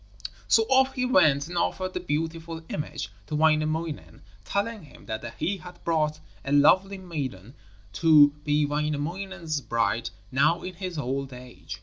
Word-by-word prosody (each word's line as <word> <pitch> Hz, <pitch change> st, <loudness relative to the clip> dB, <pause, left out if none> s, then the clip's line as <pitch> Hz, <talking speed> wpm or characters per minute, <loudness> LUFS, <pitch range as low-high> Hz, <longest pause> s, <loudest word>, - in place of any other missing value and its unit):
So 225 Hz, -, +5 dB
off 265 Hz, +3 st, +3 dB
he 255 Hz, -1 st, 0 dB
went 155 Hz, -, +4 dB
and 175 Hz, -, -7 dB
offered 185 Hz, +2 st, -1 dB
the -, -, -2 dB
beautiful 165 Hz, 0 st, -3 dB
image 150 Hz, -, -4 dB, 0.2 s
to 150 Hz, -, -3 dB
Wainamoinen, 155 Hz, 0 st, 0 dB, 0.2 s
telling 205 Hz, -2 st, -2 dB
him 140 Hz, -, -16 dB
that 110 Hz, 0 st, -5 dB
he 195 Hz, +3 st, -1 dB
had 180 Hz, -1 st, -13 dB
brought 155 Hz, -2 st, 0 dB, 0.2 s
a 140 Hz, -, -4 dB
lovely 185 Hz, +7 st, +4 dB
maiden 135 Hz, -, -6 dB, 0.4 s
to 150 Hz, +5 st, +7 dB
be 150 Hz, 0 st, +2 dB
Wainamoinen's 155 Hz, +3 st, -2 dB
bride 115 Hz, 0 st, 0 dB, 0.2 s
now 135 Hz, +6 st, +2 dB
in 185 Hz, -, -5 dB
his 180 Hz, -1 st, -6 dB
old 135 Hz, -1 st, -3 dB
age. 125 Hz, 0 st, -9 dB
155 Hz, 145 wpm, -26 LUFS, 145-180 Hz, 0.4 s, to